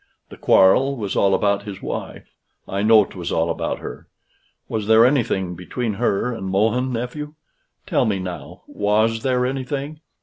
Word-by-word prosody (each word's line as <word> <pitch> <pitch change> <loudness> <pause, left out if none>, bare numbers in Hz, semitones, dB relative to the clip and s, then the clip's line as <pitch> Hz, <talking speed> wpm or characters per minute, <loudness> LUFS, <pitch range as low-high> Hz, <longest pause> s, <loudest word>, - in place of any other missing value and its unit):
The - - -11
quarrel 135 +9 +4
was 105 -4 -4
all 100 -1 +3
about 100 -1 +1
his 100 -2 -8
wife. - - -7 0.3
I 100 +1 -2
know 110 -1 +6
'twas 90 -3 -7
all 85 +1 +1
about - - -3
her. - - -9 0.6
Was 110 -2 -3
there 110 +1 +6
anything 115 -9 +1
between 105 +6 -4
her 115 +2 0
and 95 -4 -6
Mohun, 110 +7 +1
nephew? 135 +6 -5 0.5
Tell - - +1
me 100 -3 0
now 90 -1 -7
was 110 +2 0
there 125 -1 +1
anything? 135 +3 -4
110 Hz, 160 wpm, -21 LUFS, 100-125 Hz, 0.6 s, know